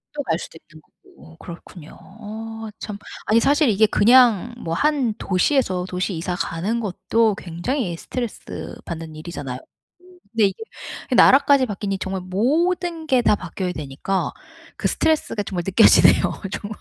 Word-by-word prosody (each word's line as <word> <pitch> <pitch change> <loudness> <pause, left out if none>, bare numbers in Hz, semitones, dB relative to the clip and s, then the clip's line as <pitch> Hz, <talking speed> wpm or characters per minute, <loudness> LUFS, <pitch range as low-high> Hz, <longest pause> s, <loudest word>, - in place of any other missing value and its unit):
또 290 - -3
갈 165 -10 -1
수도 - - -9
있는 155 -1 -18
거고 80 - -20
그렇군요. 170 -1 -11
어 220 +2 -8
참. 210 -2 -6 0.3
아니 220 +2 +4
사실 285 +2 +3
이게 215 +1 +4
그냥 235 0 +4
뭐 165 -8 -4
한 275 - +1
도시에서 185 -1 +1
도시 185 +2 -2
이사 175 +2 -3
가는 185 +7 -2
것도 220 +1 0
굉장히 175 - -3
스트레스 240 +4 -6
받는 165 -2 -7
일이잖아요. 145 -5 -6 0.7
근데 225 -2 +3
이게 195 - -6 0.5
나라까지 275 +1 +6
바뀌니 195 -2 -3
정말 190 0 -4
모든 320 - 0
게 260 -4 +3
다 210 - +4
바뀌어야 185 -2 -5
되니까 155 +5 -3 0.5
그 - - 0
스트레스가 315 -9 0
정말 185 -3 -4
느껴지네요, 195 +4 +6 0.3
정말. 205 +1 -6
205 Hz, 320 characters per minute, -22 LUFS, 175-245 Hz, 0.7 s, 나라까지